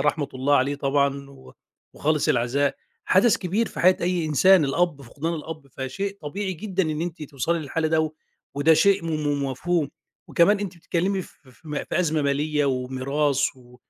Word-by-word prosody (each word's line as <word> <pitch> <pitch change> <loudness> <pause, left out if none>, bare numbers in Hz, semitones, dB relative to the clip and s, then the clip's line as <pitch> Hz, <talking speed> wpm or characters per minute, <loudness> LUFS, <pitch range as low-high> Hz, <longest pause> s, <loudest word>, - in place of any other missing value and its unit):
رحمة 150 -1 0
الله 140 +2 +2
عليه 140 +3 +1
طبعًا، 140 0 0
و 135 -1 -15 0.4
وخالص 150 0 0
العزاء، 130 +4 +1 0.3
حدث 200 +4 +4
كبير 200 +6 -1
في - - -6
حياة 185 +1 +5
أي 175 -1 0
إنسان، 165 +3 +5
الأب، 145 0 0
فقدان 150 +7 -4
الأب 155 -2 -7
فشيء 195 +10 -4
طبيعي 190 +6 -3
جدًا 190 +1 -2
إن 155 -2 -2
أنتِ 170 -1 -4
توصلي 150 +3 -1
للحالة 155 +1 -2
ده، 160 -1 +1 0.4
وده 150 +3 +4
شيء 200 +1 +3
م - - -3 0.3
م - - 0
مفهوم، 160 +3 -1 0.4
وكمان 200 +5 +4
أنتِ 195 -3 -5
بتتكلّمي 185 +3 -1
ف - - -13 0.2
ف 130 +5 -20
م 150 - -5
في - - -1
أزمة 160 -3 +1
مالية 145 +1 +1
وميراث 135 +2 0
و 125 -1 -18
155 Hz, 175 wpm, -24 LUFS, 140-175 Hz, 0.4 s, حياة